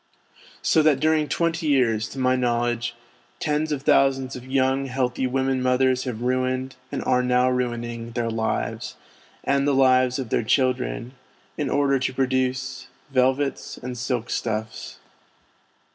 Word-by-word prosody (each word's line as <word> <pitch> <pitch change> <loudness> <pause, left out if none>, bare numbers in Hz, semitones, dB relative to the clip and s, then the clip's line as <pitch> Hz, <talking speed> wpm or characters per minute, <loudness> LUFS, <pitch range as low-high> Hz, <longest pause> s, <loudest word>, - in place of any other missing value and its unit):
So 160 - +4
that 150 -3 +3
during 155 0 +2
twenty 170 0 -1
years, 115 -6 +2
to - - -10
my 130 -1 +2
know 120 -2 +1
ledge, 120 0 -2 0.4
tens 155 +1 0
of 140 -2 -2
thousands 135 -2 +3
of 125 0 -9
young, 135 +1 +1
healthy 130 0 -1
women 130 0 0
mothers 130 0 +2
have 120 -2 -4
ruined, 130 +1 -1 0.2
and - - -3
are 125 - +2
now 125 0 +2
ruining, 120 -2 -3
their 115 -1 -1
lives, 110 0 -2 0.5
and 140 +1 +1
the 140 - +2
lives 130 -1 +4
of 130 -4 -4
their - - +1
children, 125 0 0 0.4
in - - -2
order 140 -1 +2
to 130 - -1
produce 130 0 -1 0.2
velvets 135 +1 0
and 125 0 -6
silk 125 -1 -3
stuffs. 110 -1 -3
130 Hz, 145 wpm, -24 LUFS, 125-135 Hz, 0.5 s, So